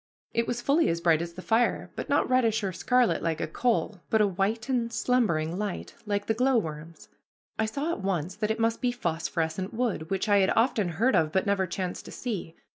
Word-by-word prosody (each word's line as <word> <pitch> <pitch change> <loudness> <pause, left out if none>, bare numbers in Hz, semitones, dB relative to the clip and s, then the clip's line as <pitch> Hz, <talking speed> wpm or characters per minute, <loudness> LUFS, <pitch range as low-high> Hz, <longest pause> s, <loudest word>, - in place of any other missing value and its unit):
It 230 0 +1
was 240 0 -3
fully 300 +6 +3
as 165 - 0
bright 165 -1 +3
as 170 0 -5
the 185 +2 -9
fire, 235 +2 +1
but - - -5
not - - +2
reddish 230 -4 +2
or 190 -2 -1
scarlet 250 +5 +2
like 165 -1 -1
a - - 0
coal, 215 0 -1
but 220 - +3
a 210 - +5
white 200 +4 -1
and 240 -3 0
slumbering 200 -8 +1
light, 205 -3 -4
like 205 0 -1
the 220 - +1
glowworm's. 170 - -1 0.5
I 220 - +2
saw 285 +9 -2
at 340 - -4
once 185 -3 -1
that 210 0 -1
it 220 +1 -1
must 225 0 +1
be 250 - +2
phosphorescent 170 -2 -2
wood, 220 -9 -1
which 195 +2 -1
I 205 -1 +5
had 190 - +3
often 225 -5 +2
heard 225 +11 +2
of, 155 -1 +2
but 190 - +1
never 200 -2 +1
chanced 180 +1 -4
to - - -9
see. 195 -9 -5
205 Hz, 215 wpm, -27 LUFS, 175-235 Hz, 0.5 s, a